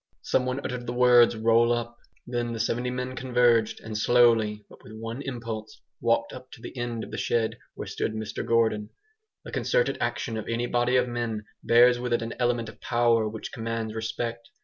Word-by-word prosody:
Someone 130 +1 0
uttered 125 -2 -5
the 120 - -2
words 120 -1 +6
"roll 115 +1 +3
up!". 120 0 -2 0.3
Then 120 -1 -2
the 115 - -5
seventy 120 +4 0
men 125 +1 -4
converged, 120 -3 +2
and 110 -1 -7
slowly, 110 -2 +3
but - - -17
with - - -12
one 115 +4 -6
impulse, 115 -5 -6 0.2
walked 115 0 +1
up 130 0 -10
to - - -12
the - - -9
end 120 -2 -3
of - - -9
the - - -4
shed 115 -2 0 0.2
where - - -6
stood - - -3
Mr 110 -1 -4
Gordon. 110 -2 +1 0.6
The - - -8
concerted - - +1
action 115 - -2
of 110 - -5
any 115 +1 -1
body 120 +1 +1
of 125 0 +3
men 115 -3 -3 0.2
bears 120 +1 +6
with 125 -1 -2
it 120 - +1
an 115 - -4
element 120 -2 +1
of 110 - -12
power 115 -2 +2
which 110 0 -7
commands 115 -1 -3
respect. 115 +1 -4
115 Hz, 195 wpm, -26 LUFS, 115-120 Hz, 0.6 s, words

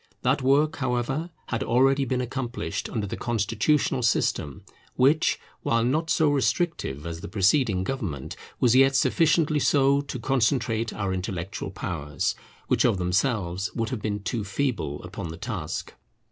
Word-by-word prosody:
That 130 +3 +2
work, 145 +4 +3
however, 130 +5 -1 0.2
had 115 - -1
already 135 +3 +3
been 130 -1 -1
accomplished 125 0 -4
under 110 -3 -2
the 100 - -4
Constitutional 125 +5 +1
system; 75 - 0 0.3
which, 140 +5 +3 0.2
while 115 0 +1
not 155 +7 0
so 155 -2 +3
restrictive 140 - 0
as 85 -1 -5
the - - -6
preceding 100 - +2
government, 95 - -4 0.2
was 120 -1 +4
yet 135 +1 +5
sufficiently 155 +1 +3
so 140 -1 +3
to 140 -2 -6
concentrate 115 -2 +1
our 100 -2 -2
intellectual 90 0 -4
powers, 75 -1 -2 0.3
which - - +2
of - - +3
themselves 95 0 0
would 115 -2 -1
have 125 -5 -4
been 105 -1 -3
too 110 0 -2
feeble, 95 - -2
upon 90 0 -6
the 80 - -7
task. 90 -6 -5
120 Hz, 145 wpm, -26 LUFS, 95-135 Hz, 0.3 s, yet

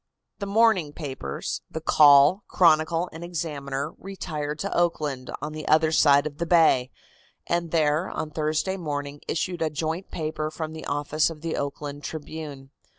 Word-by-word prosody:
The 200 - -4
morning 200 -7 +3
papers, 130 - -5
the 160 - -5
Call, 150 +4 +6
Chronicle 165 0 +3
and 160 +1 -8
Examiner, 150 -4 -4
retired 155 -6 -5
to 200 +5 -3
Oakland, 150 -6 0
on 150 0 -4
the 155 0 -7
other 155 +1 +4
side 145 -2 +5
of 150 -1 -6
the 170 - -2
bay, 160 -7 +4 0.6
and 170 -1 -1
there, 155 +1 +1
on 155 - -4
Thursday 155 +5 -1
morning, 145 -4 -4
issued 175 +1 -2
a 160 - +1
joint 160 +4 -3
paper 155 -1 -3
from 155 0 -5
the 160 - -8
office 145 +2 +1
of 160 -2 -9
the 165 0 -2
Oakland 145 0 -5
Tribune. 150 -3 -7
155 Hz, 155 wpm, -25 LUFS, 145-170 Hz, 0.6 s, Call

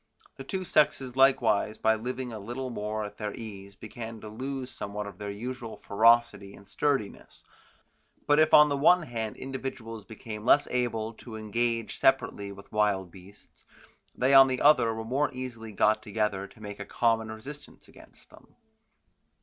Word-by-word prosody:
The 135 - -8
two 185 +7 -4
sexes 135 -6 +1
likewise 120 -6 +3
by 110 - +3
living 125 +2 -4
a 110 - -6
little 120 +5 -5
more 105 -1 -3
at 105 - -10
their 105 -2 -4
ease 100 -4 -9
began 115 +1 -8
to 110 - -8
lose 130 +3 -5
somewhat 105 +1 -5
of 100 -3 -10
their 105 -1 -5
usual 115 +3 -6
ferocity 115 -1 +2
and 100 - -17
sturdiness; 135 -8 -2 0.8
but 145 +1 +4
if 155 0 +4
on 150 0 +8
the 140 - 0
one 175 +5 +5
hand 115 -6 -5
individuals 130 -4 -6
became 105 0 -9
less 145 +4 +4
able 115 -3 -1
to 115 -3 -9
engage 115 +1 -2
separately 105 -6 +1
with 100 0 -13
wild 100 -4 0
beasts, 95 +3 -17 0.5
they 130 +2 +2
on 135 0 +9
the 130 -1 -2
other 130 -6 +5
were 110 0 -5
more 140 +5 0
easily 120 -4 -7
got 110 +1 +2
together 105 -2 -2
to - - -20
make 105 0 -8
a 100 - -5
common 115 +1 0
resistance 140 +7 -11
against - - -17
them. - - -19
115 Hz, 165 wpm, -28 LUFS, 105-130 Hz, 0.8 s, on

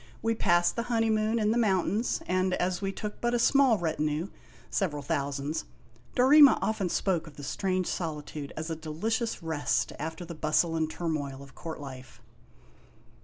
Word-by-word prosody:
We 225 0 +2
passed 175 -5 +2
the 235 - 0
honeymoon 225 -1 +2
in 215 -1 +2
the 235 - +2
mountains, 205 +1 +1
and 185 0 +1
as 180 +1 -1
we 195 -1 -1
took 210 +2 -6
but 240 0 +1
a - - +3
small 260 -1 +4
retinue, 155 0 -1 0.4
several 150 -7 -1
thousands, 140 +2 -2 0.5
Dorema 280 +2 +7
often 205 -4 -1
spoke 170 -2 0
of 150 - -12
the 145 - -9
strange 185 +5 -1
solitude 150 -4 -4
as 160 +1 -4
a - - -1
delicious 195 +9 -2
rest 160 -3 0
after 160 +4 -5
the 170 - -7
bustle 155 +1 +1
and 160 -1 0
turmoil 145 -5 -3
of 135 -1 -15
court 160 -2 -7
life. 130 -3 -10
175 Hz, 165 wpm, -29 LUFS, 155-215 Hz, 0.5 s, Dorema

